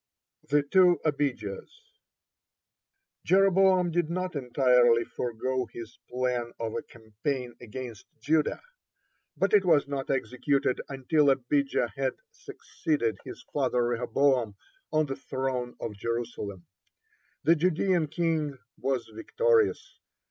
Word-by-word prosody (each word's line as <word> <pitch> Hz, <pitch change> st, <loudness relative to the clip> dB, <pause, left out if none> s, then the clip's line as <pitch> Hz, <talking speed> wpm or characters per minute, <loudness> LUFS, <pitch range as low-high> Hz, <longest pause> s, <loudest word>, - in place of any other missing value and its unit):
(15) 145 Hz, -, +3 dB
THE -, -, -24 dB
TWO 180 Hz, +2 st, +5 dB
ABIJAHS 140 Hz, -, -2 dB, 1.4 s
Jeroboam 190 Hz, -1 st, +4 dB
did 170 Hz, -1 st, 0 dB
not 185 Hz, 0 st, -3 dB
entirely 125 Hz, -3 st, +3 dB
forego 125 Hz, +1 st, -3 dB
his 115 Hz, -1 st, -10 dB
plan 125 Hz, -2 st, -1 dB
of 115 Hz, -1 st, -3 dB
a -, -, -2 dB
campaign 120 Hz, +3 st, -5 dB
against 120 Hz, -2 st, -8 dB
Judah, 155 Hz, -, +1 dB, 0.7 s
but 195 Hz, -, +1 dB
it 205 Hz, -2 st, +6 dB
was 160 Hz, -6 st, +3 dB
not 140 Hz, -1 st, -4 dB
executed 135 Hz, 0 st, 0 dB
until 140 Hz, +2 st, +2 dB
Abijah 135 Hz, -1 st, +1 dB
had 135 Hz, -1 st, -1 dB, 0.2 s
succeeded 150 Hz, -, -3 dB
his 125 Hz, -, -9 dB
father 130 Hz, -4 st, +1 dB
Rehoboam 120 Hz, -1 st, +1 dB, 0.4 s
on 155 Hz, 0 st, +2 dB
the 135 Hz, -2 st, -4 dB
throne 130 Hz, -2 st, -3 dB
of 110 Hz, -, -4 dB
Jerusalem. 115 Hz, -5 st, -4 dB, 0.8 s
The 165 Hz, -, +5 dB
Judean 175 Hz, 0 st, +1 dB
king 160 Hz, -3 st, -1 dB, 0.2 s
was 130 Hz, -3 st, -1 dB
victorious. 460 Hz, -, +1 dB
135 Hz, 110 wpm, -28 LUFS, 120-160 Hz, 1.4 s, it